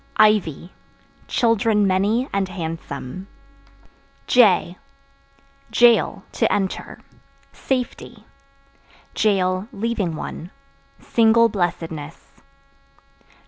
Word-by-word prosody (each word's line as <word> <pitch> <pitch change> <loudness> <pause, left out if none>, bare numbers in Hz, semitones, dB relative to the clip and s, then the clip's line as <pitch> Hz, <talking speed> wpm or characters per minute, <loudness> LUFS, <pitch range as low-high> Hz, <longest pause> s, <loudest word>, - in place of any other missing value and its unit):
Ivy 200 -6 +2 0.5
Children 225 -3 +2
many 205 +7 +1
and 195 -1 -1
handsome. 165 -1 -6 1.0
J 190 -7 +3 0.9
Jail 240 -1 +3
(To - - 0
enter) 195 -2 -3 0.5
safety; 255 -2 -4 1.0
(leaving 195 0 -1
one) 165 +2 -7 0.5
single 230 0 +3
blessedness. 165 -5 -4
195 Hz, 60 wpm, -21 LUFS, 175-225 Hz, 1.0 s, J